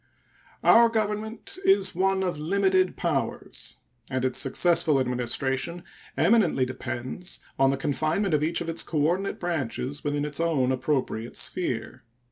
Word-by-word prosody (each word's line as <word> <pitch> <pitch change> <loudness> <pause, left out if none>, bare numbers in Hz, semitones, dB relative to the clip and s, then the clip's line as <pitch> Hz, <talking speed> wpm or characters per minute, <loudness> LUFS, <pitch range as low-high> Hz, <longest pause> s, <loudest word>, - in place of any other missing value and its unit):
Our 235 0 +7
Government 220 - -3
is 385 - +4
one 190 +1 +1
of 180 -5 -2
limited 185 +3 +2
powers, 155 -6 -3 0.3
and 130 -1 -1
its 130 0 0
successful 165 -1 +2
administration 130 +6 -1 0.3
eminently 190 - +3
depends 130 +7 -5 0.2
on 135 0 +5
the 135 - 0
confinement 155 +7 0
of 150 - +3
each 160 +3 0
of 170 - -3
its 165 - 0
coordinate 170 +6 0
branches 145 -4 -3
within 145 0 -1
its 150 0 -5
own 150 -6 +1
appropriate 130 -4 -2
sphere. 130 -12 -2
155 Hz, 130 wpm, -26 LUFS, 130-185 Hz, 0.3 s, Our